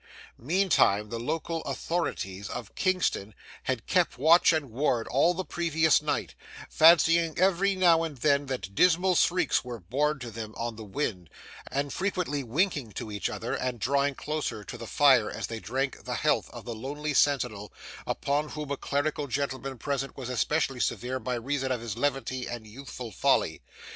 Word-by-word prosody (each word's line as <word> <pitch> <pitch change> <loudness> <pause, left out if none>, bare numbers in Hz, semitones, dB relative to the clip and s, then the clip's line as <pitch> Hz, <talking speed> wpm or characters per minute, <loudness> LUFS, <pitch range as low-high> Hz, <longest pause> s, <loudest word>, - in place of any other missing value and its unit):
Meantime 130 - +2
the 115 - -4
local 160 +5 -2
authorities 100 - -3
of 120 -4 -6
Kingston 180 - 0 0.3
had - - -2
kept - - +1
watch 160 +7 +6
and 155 -6 -1
ward 120 -2 0
all 165 +7 +3
the 185 +1 -3
previous 160 -2 +2
night, - - -2 0.4
fancying 165 0 +5
every 195 +2 +3
now 175 -3 +5
and 160 -4 -4
then 140 +1 +2
that 100 -8 -4
dismal 180 - +4
shrieks 180 -1 +2
were 120 -2 -6
borne 145 - 0
towards 120 -5 -8
them 110 -1 -6
on 115 -1 -3
the 110 - -8
wind, 100 - -3 0.4
and 140 +1 -2
frequently 180 -7 -1
winking 140 - 0
to 110 - -6
each 105 -1 -2
other, 115 - -4
and 125 -2 -2
drawing 140 +4 +1
closer 150 -9 -3
to - - -8
the 115 - -8
fire 130 -6 +4
as 110 - -4
they 115 -1 -5
drank 130 +5 -3
the - - -3
health - - +1
of - - -10
the 120 - -4
lonely 145 +6 -4
sentinel, 125 -9 +1 0.4
upon 145 +2 -1
whom 150 -2 -6
a 140 - -1
clerical 145 +1 -1
gentleman 135 0 -3
present 135 +2 -3
was 130 -2 -5
especially 135 +2 0
severe 125 +2 -1
by 125 -1 -2
reason 130 +2 -2
of 125 - 0
his 115 -3 -5
levity 130 -1 -1
and 120 -2 -6
youthful 125 +1 -8
folly. - - +1
135 Hz, 170 wpm, -28 LUFS, 120-155 Hz, 0.4 s, watch